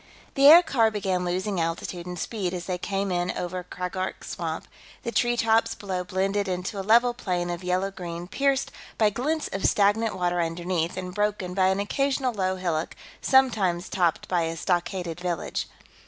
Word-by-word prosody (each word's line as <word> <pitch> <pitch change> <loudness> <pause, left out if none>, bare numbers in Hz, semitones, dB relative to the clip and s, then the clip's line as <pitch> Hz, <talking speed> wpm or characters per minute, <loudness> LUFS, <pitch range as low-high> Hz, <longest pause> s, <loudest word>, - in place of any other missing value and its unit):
The 275 0 +6
aircar 290 -8 +7
began 190 -4 -1
losing 185 +1 -1
altitude 170 +1 -3
and 180 0 -5
speed 185 -1 -3
as 175 - -5
they 180 -1 -3
came 195 +1 -2
in 175 0 0
over 180 +1 -3
Kraggork 180 +1 -4
Swamp; - - -4 0.4
the 235 - -3
treetops 230 -2 +2
below 185 -3 -3
blended 195 +2 -1
into 185 +2 -3
a - - -1
level 235 +5 +4
plain 180 -7 -2
of 175 +1 -5
yellow 185 +2 0
green, 175 -2 -6
pierced 275 +5 0 0.3
by 215 -2 +4
glints 300 +8 -1
of 195 - -3
stagnant 210 +2 +3
water 175 -1 +1
underneath 170 +1 -2
and 180 -1 -5
broken 205 -2 -1
by 185 0 +3
an 190 +1 +1
occasional 265 +4 0
low 190 -3 0
hillock, 170 -3 -2 0.3
sometimes 210 -10 +3
topped 175 -4 0
by 180 -2 +1
a 165 0 -4
stockaded 175 -1 -1
village. 180 -1 -3
185 Hz, 170 wpm, -26 LUFS, 180-215 Hz, 0.4 s, aircar